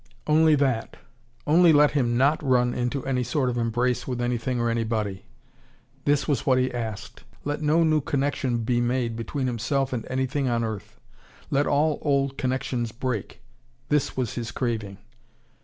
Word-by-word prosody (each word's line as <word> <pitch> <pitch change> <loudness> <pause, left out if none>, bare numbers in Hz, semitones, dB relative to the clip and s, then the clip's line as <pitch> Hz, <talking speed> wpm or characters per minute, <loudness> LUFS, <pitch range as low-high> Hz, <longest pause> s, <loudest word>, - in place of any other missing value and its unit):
Only 155 0 +5
that. 130 -5 0 0.5
Only 165 +3 +6
let 150 -1 +5
him 120 -5 +1
not 140 +4 +3
run 125 -3 +2
into 125 +2 -2
any 130 -2 0
sort 125 +1 0
of 120 - -4
embrace 120 +2 0
with 125 -2 -3
anything 120 +1 -1
or 120 - +1
anybody 110 -4 -2 0.8
this 145 -1 +2
was 140 -6 0
what 130 -1 +3
he 130 0 0
asked. 110 -4 -6 0.2
Let 145 +1 -2
no 155 +2 +3
new 155 -1 +3
connection 135 -4 -1
be 120 +1 +1
made 120 -1 0
between 125 +4 -3
himself 130 +3 -1
and 115 -3 -4
anything 130 +2 -1
on 115 -1 0
earth. 110 -3 -6 0.5
Let 140 +1 +2
all 150 +1 +2
old 140 -2 +1
connections 130 -2 -1
break. 120 -3 -4 0.5
This 150 -3 0
was 125 -4 -1
his 115 -2 -4
craving. 110 -6 -3
130 Hz, 160 wpm, -25 LUFS, 120-140 Hz, 0.8 s, Only